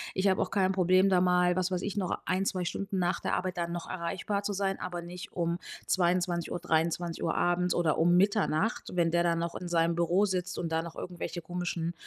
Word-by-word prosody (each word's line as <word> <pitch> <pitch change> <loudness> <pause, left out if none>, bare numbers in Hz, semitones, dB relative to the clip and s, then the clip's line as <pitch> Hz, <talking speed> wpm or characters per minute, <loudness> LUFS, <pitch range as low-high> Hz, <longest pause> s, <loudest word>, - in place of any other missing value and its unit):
ich 190 +1 +2
habe 190 - +3
auch - - 0
kein 190 -1 +2
Problem, 185 +1 +4
da 185 -2 +4
mal 180 0 +3
was 185 0 0
weiß 180 0 -1
ich, 205 - -3
noch 185 -3 -1
1, 190 +1 0
2 180 -2 -1
Stunden 195 +2 -3
nach 175 +1 +1
der - - -1
Arbeit 180 -1 -3
dann 170 0 -2
noch 175 -1 -5
erreichbar 185 +3 -2
zu 205 - -2
sein, 195 0 -1
aber 175 -1 -5
nicht 175 +1 -8
um 170 0 -1 0.3
22:00, 175 -1 +1
23:00 165 0 0
abends 175 0 +1
oder 160 -3 +1
um 175 +2 +4
Mitternacht, 200 0 +2
wenn 170 -2 +2
der 170 0 +3
dann 170 -1 +2
noch 170 0 -2
in 180 - -5
seinem 170 -1 +2
Büro 175 +4 +3
sitzt 185 -2 -2
und 165 -2 -3
da 160 0 +1
noch 165 -1 -8
irgendwelche 175 0 -5
komischen 175 -1 -3
180 Hz, 220 wpm, -30 LUFS, 170-185 Hz, 0.3 s, Problem